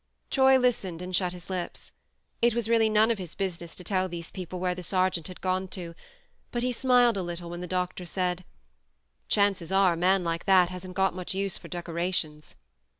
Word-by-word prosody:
Troy 265 -1 +6
listened 220 -9 0
and 180 0 -1
shut 180 -1 +1
his 180 -1 -10
lips. 185 -2 -4 0.5
It 235 -1 +4
was 235 -2 0
really 225 -1 +4
none 215 +2 +4
of 225 - -1
his 175 -3 -6
business 175 -4 -3
to 180 - -8
tell 185 -1 0
these 170 -1 -6
people 185 -1 -6
where 180 0 0
the 180 - -7
sergeant 185 -1 0
had 185 - -10
gone 185 0 0
to; 170 -2 -6 0.6
but 240 0 -1
he 250 - +1
smiled 245 -2 +4
a - - 0
little 175 -1 -5
when 175 0 -6
the 180 - -5
doctor 180 0 -2
said: 180 0 -1 0.4
" - - -47
Chances 195 -4 +2
are 190 -2 +4
a - - -3
man 185 +2 +3
like 165 0 -2
that 185 -3 +5
hasn't 185 0 -8
got 190 0 +2
much 185 +1 -4
use 195 -1 -1
for - - -8
decorations 170 -3 -3
185 Hz, 210 wpm, -28 LUFS, 175-195 Hz, 0.6 s, Troy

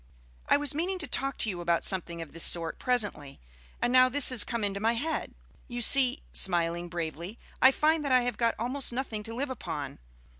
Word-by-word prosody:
"I - - +5
was 290 -1 +1
meaning 355 +5 -2
to 320 -5 -4
talk 275 0 -1
to 220 - +1
you 175 -2 -7
about 170 -1 0
something 170 -3 0
of 155 - -16
this 165 - -5
sort 165 -1 -1
presently, 205 - -1 0.4
and 245 - -1
now 255 0 +6
this 285 +1 +2
has 255 -5 +4
come 235 -3 -4
into 200 -1 -2
my 225 +3 +1
head. 310 +7 -4 0.3
You 240 -1 -6
see," 260 +2 +5
smiling 175 -1 +2
bravely, 170 +4 -6 0.2
"I 260 - +8
find 310 +2 +1
that 280 - -3
I 255 -1 +4
have 245 -3 -3
got 230 -1 0
almost 250 +4 -1
nothing 240 -4 -4
to 225 +2 -8
live 270 +2 -4
upon. 155 - -6
235 Hz, 210 wpm, -28 LUFS, 175-260 Hz, 0.4 s, I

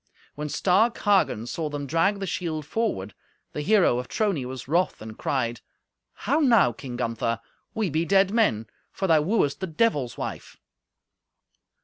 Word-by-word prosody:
When 150 0 -5
stark 205 +9 +2
Hagen 195 - +2
saw 155 +5 -3
them 145 -1 -4
drag 165 +7 +1
the 195 - -3
shield 160 -5 -3
forward, 150 - -2 0.4
the 150 - -3
hero 180 - +3
of 125 - -6
Trony 195 - -1
was 130 0 -7
wroth, 175 +5 +1
and 110 0 -9
cried, 120 -4 -2 0.6
"How 280 +8 +2
now, 230 - +5
King 125 +2 -8
Gunther? 115 -1 -1 0.4
We 215 -6 -1
be 160 +3 +1
dead 195 +2 +3
men, 205 - +2 0.3
for 195 - -3
thou 160 -4 +4
wooest 150 -4 +1
the 190 - -3
Devil's 155 - 0
wife!" - - -6
160 Hz, 155 wpm, -25 LUFS, 125-200 Hz, 0.6 s, now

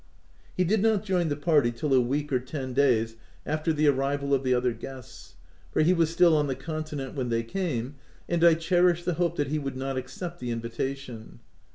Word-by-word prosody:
He 185 - +3
did 200 +4 +2
not 215 -2 +2
join 180 -4 +1
the 145 - 0
party 145 -5 +2
till 135 +4 -2
a 130 - +6
week 145 +4 -2
or 130 - +3
ten 130 +1 -5
OF - - -8
WILDFELL 140 - +4
HALL. 130 - +5
25 110 0 0
days 115 0 -15 0.3
after 155 +2 0
the 155 -1 +2
arrival 140 0 +1
of 135 -1 +2
the 130 - 0
other 125 -1 +2
guests; 130 +2 -11 0.4
for - - +2
he 175 +4 +4
was 165 -3 +2
still 165 0 +4
on 150 -1 +2
the 135 - -2
continent 150 -1 -5
when 130 -3 -3
they 115 0 0
came, 135 -2 -3 0.3
and 170 -1 0
I 170 -1 +7
cherished 175 +1 +2
the 180 - +1
hope 170 -1 +1
that 145 -3 -1
he 155 +1 0
would 135 -2 -5
not 135 0 -3
accept 175 +6 -6
the 125 - -5
invitation. 115 +1 -5
145 Hz, 230 wpm, -27 LUFS, 130-165 Hz, 0.4 s, I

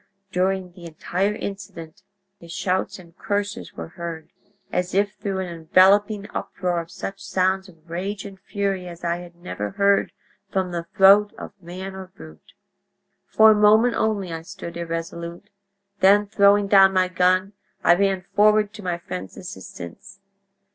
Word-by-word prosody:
During 185 0 0
the 175 0 -13
entire 180 +5 -2
incident 170 -6 -8 0.4
his 170 -2 -12
shouts 185 +2 -1
and 170 -3 -16
curses 205 +1 -3
were 80 -1 -7
heard, 165 -2 -7 0.4
as 180 +1 -2
if 200 0 +2
through 200 -2 -4
an 185 - -4
enveloping 195 +5 +3
uproar 180 -2 -2
of 165 - -12
such 195 +2 -7
sounds 190 +1 0
of 165 -2 -21
rage 190 +4 -4
and 195 -1 -10
fury 195 -2 -3
as 170 -1 -10
I 170 0 0
had 175 -1 -11
never 170 - -5
heard 200 0 +2 0.4
from 190 -2 -1
the 170 -1 -4
throat 200 +2 +6
of - - -8
man 185 +3 -7
or 190 -1 -8
brute! 80 - -15 0.7
"For 220 0 +6
a - - +4
moment 215 +3 +5
only 200 -5 -1
I 165 - -5
stood 180 0 -9
irresolute, 170 +3 -6 0.5
then, 205 +2 +5
throwing 200 0 +4
down 195 -1 +6
my 185 -1 +3
gun, 185 +2 +2 0.3
I - - +6
ran 195 0 +1
forward 210 0 +4
to 210 -1 -10
my 175 -2 -1
friend's 95 - -7
assistance. 140 - -10
190 Hz, 155 wpm, -23 LUFS, 170-200 Hz, 0.7 s, throat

